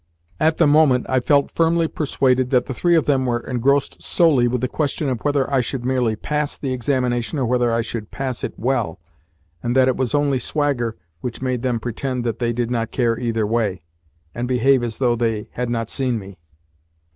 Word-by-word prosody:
At 160 Hz, +1 st, +2 dB
the 170 Hz, -, +4 dB
moment, 145 Hz, -4 st, +4 dB
I 130 Hz, -, +2 dB
felt 140 Hz, +2 st, +2 dB
firmly 165 Hz, 0 st, +2 dB
persuaded 130 Hz, -5 st, +1 dB
that 125 Hz, -2 st, +2 dB
the 130 Hz, -, -4 dB
three 175 Hz, +7 st, +2 dB
of 160 Hz, -, +3 dB
them 135 Hz, -3 st, +1 dB
were 120 Hz, -1 st, +1 dB
engrossed 135 Hz, +4 st, 0 dB
solely 145 Hz, -8 st, +3 dB
with 125 Hz, 0 st, -1 dB
the 130 Hz, -, +1 dB
question 150 Hz, +1 st, -2 dB
of 125 Hz, -3 st, -2 dB
whether 145 Hz, -2 st, +1 dB
I 135 Hz, -2 st, +2 dB
should 125 Hz, 0 st, -4 dB
merely 125 Hz, -4 st, +1 dB
PASS 150 Hz, +6 st, -2 dB
the 135 Hz, -2 st, -3 dB
examination 125 Hz, +1 st, -1 dB
or 130 Hz, -, 0 dB
whether 120 Hz, 0 st, +1 dB
I 115 Hz, 0 st, +1 dB
should 110 Hz, -2 st, -5 dB
pass 130 Hz, -3 st, -4 dB
it -, -, -4 dB
WELL, 115 Hz, -8 st, -1 dB, 0.6 s
and 120 Hz, +5 st, -1 dB
that 130 Hz, -1 st, +5 dB
it 130 Hz, -, +2 dB
was 130 Hz, +2 st, 0 dB
only 145 Hz, -2 st, +2 dB
swagger 125 Hz, -4 st, -1 dB, 0.2 s
which 120 Hz, +5 st, -5 dB
made 130 Hz, -2 st, -1 dB
them 125 Hz, -2 st, 0 dB
pretend 125 Hz, +2 st, -3 dB
that 115 Hz, -2 st, -2 dB
they 120 Hz, -1 st, 0 dB
did 120 Hz, 0 st, -2 dB
not 115 Hz, -2 st, -1 dB
care 115 Hz, -3 st, 0 dB
either 115 Hz, -3 st, 0 dB
way, 105 Hz, -5 st, -1 dB, 0.5 s
and 120 Hz, +1 st, -3 dB
behave 130 Hz, +1 st, +3 dB
as 115 Hz, -2 st, -4 dB
though 125 Hz, -3 st, +2 dB
they 115 Hz, -2 st, -1 dB
had 125 Hz, -1 st, -3 dB
not 115 Hz, -2 st, -1 dB
seen 125 Hz, -1 st, -1 dB
me. 100 Hz, -3 st, -10 dB
125 Hz, 205 wpm, -21 LUFS, 120-140 Hz, 0.6 s, that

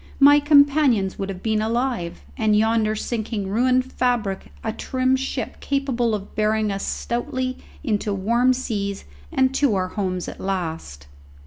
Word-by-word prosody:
My 290 Hz, +1 st, +8 dB
companions 285 Hz, -8 st, +4 dB
would 195 Hz, -, -3 dB
have 185 Hz, -2 st, -7 dB
been 220 Hz, -1 st, +1 dB
alive, 230 Hz, -5 st, -2 dB
and 215 Hz, -2 st, +2 dB
yonder 220 Hz, 0 st, +2 dB
sinking 215 Hz, -3 st, -3 dB
ruined 255 Hz, +4 st, +2 dB
fabric 235 Hz, -6 st, -1 dB
a 220 Hz, -1 st, -2 dB
trim 260 Hz, +2 st, 0 dB
ship 265 Hz, +1 st, -4 dB
capable 260 Hz, -5 st, 0 dB
of 200 Hz, -1 st, -8 dB
bearing 215 Hz, 0 st, +1 dB
us 195 Hz, 0 st, -3 dB
stoutly 255 Hz, +1 st, -3 dB, 0.2 s
into 215 Hz, -5 st, -1 dB
warm 235 Hz, +6 st, +2 dB
seas 205 Hz, -6 st, -3 dB, 0.3 s
and 260 Hz, 0 st, +2 dB
to 270 Hz, -5 st, +2 dB
our 185 Hz, -1 st, -1 dB
homes 185 Hz, -3 st, -3 dB
at -, -, -8 dB
last. 165 Hz, -, -4 dB
220 Hz, 145 wpm, -23 LUFS, 200-255 Hz, 0.3 s, My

